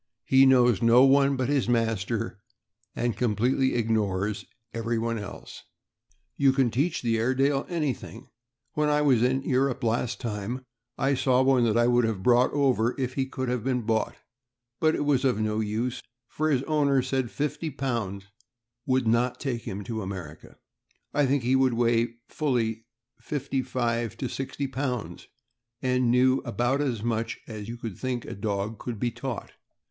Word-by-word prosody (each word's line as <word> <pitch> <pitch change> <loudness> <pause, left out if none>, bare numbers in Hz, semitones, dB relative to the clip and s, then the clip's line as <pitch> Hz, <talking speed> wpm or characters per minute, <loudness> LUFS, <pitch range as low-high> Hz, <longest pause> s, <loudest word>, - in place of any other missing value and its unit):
He 135 0 +5
knows 125 -5 +4
no 120 +2 +6
one 140 +1 +5
but 130 -2 -1
his 140 -4 +1
master, 115 -2 -1 0.6
and 120 -1 -1
completely 125 +4 +1
ignores 105 -3 0 0.3
everyone 115 0 -1
else.... 100 -1 -9 0.8
You 135 -1 +4
can 130 -3 +2
teach 145 +8 0
the 115 -2 +1
Airedale 135 +4 +1
Terrrier 175 - -5
anything. 135 -5 -4 0.5
When 150 0 +1
I 150 0 +2
was 130 -6 +4
in 130 +2 +1
Europe 135 -1 +1
the - - -2
last 115 +1 0
time, 115 +2 -4 0.3
I 135 +2 +1
saw 130 -1 +3
one 130 -2 +4
that 115 0 +2
I 120 - +4
would 120 0 +3
have 105 -4 -2
brought 125 +2 +4
over 130 -4 +1
if 125 -1 -2
he 135 0 -1
could 130 -1 -4
have 125 -2 -1
been 125 -2 0
bought; 110 0 0 0.6
but 155 0 +3
it 145 - -1
was 140 -3 +2
of 125 -5 +2
no 110 0 0
use, 110 +3 -2 0.3
for 155 +5 -1
his 135 -3 +1
owner 140 -3 +2
said 130 -1 -1
£50 130 - -3 0.6
would 130 -2 +2
not 120 +2 +1
take 125 -4 -3
him 100 +1 -4
to 110 +1 -4
America. 90 -6 -8 0.6
I 145 -1 +3
think 135 -1 +1
he 125 +2 +2
would 130 -2 +3
weigh 115 0 +1
fully 115 -7 -1 0.3
fifty 140 -2 -2
five 120 -3 -2
to 130 - -3
sixty 135 +2 -4
pounds, 130 -3 -4 0.5
and 125 -1 +1
knew 130 +2 +4
about 120 +2 -1
as 120 -7 -2
much 115 -1 -2
as 110 -1 -7
you 120 - -5
would 110 -5 -5
think 125 -3 -3
a - - -6
dog 100 +1 -3
could 120 -4 -5
be 120 +1 0
taught. 130 -1 -6
125 Hz, 170 wpm, -27 LUFS, 115-135 Hz, 0.8 s, no